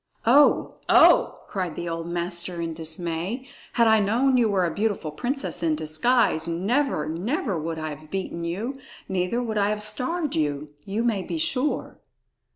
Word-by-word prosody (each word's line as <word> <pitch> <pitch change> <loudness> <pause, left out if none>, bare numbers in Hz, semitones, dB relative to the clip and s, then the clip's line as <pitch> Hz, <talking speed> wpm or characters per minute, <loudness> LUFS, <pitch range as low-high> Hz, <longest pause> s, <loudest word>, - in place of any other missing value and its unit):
"Oh! 280 +6 +4
Oh!" - - +5
cried 180 -5 -3
the 175 - -4
old 165 0 -4
master 175 0 -2
in 165 -1 -3
dismay. 170 - -3 0.3
"Had 235 - +4
I 220 -1 +5
known 240 +6 +2
you 235 -3 +3
were 190 -3 +2
a 170 - -2
beautiful 205 -7 -1
princess 260 - -2
in 160 -2 +2
disguise, 160 +3 +1
never, 190 - 0
never 190 - -2
would 160 +1 -4
I 155 0 -3
have 155 +1 -13
beaten 185 -2 -4
you; 215 +11 -3 0.3
neither 190 +6 -1
would 220 -3 -1
I 200 0 +2
have 210 0 -1
starved 265 +9 -1
you, 150 -1 -1 0.2
you 205 +4 -2
may 225 -5 +1
be 325 - -4
sure." 300 -3 -1
195 Hz, 165 wpm, -25 LUFS, 165-240 Hz, 0.3 s, Oh